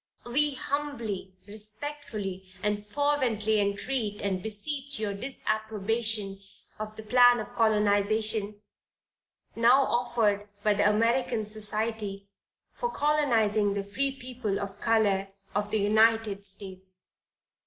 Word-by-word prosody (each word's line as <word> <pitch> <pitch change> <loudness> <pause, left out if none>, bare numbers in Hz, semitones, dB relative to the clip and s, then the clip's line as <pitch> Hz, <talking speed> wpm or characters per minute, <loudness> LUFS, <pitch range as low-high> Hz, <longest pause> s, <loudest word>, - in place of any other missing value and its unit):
"We 285 +4 +1
humbly, 235 -10 -3
respectfully, 210 -3 -4
and 210 0 -1
fervently 235 -5 +1
entreat 205 +2 -1
and 190 -2 -1
beseech 270 +6 -3
your 210 -2 -1
disapprobation 220 -2 -2 0.4
of 215 0 -5
the 220 - -8
plan 245 +2 +6
of 215 - -7
colonization 210 -1 +2 1.0
now 245 +4 +5
offered 225 -5 +1 0.2
by 210 - +4
the 205 +1 +3
"American 230 +1 +1
Society 210 -1 -1 0.5
for 480 - -2
Colonizing 225 - +2
the 200 - -1
Free 235 +8 -1
People 250 -6 -3
of 200 0 -6
Color 205 -4 +2 0.3
of 205 0 -1
the 220 - +1
United 215 -1 +3
States." 190 -1 -4
215 Hz, 110 wpm, -28 LUFS, 205-240 Hz, 1.0 s, plan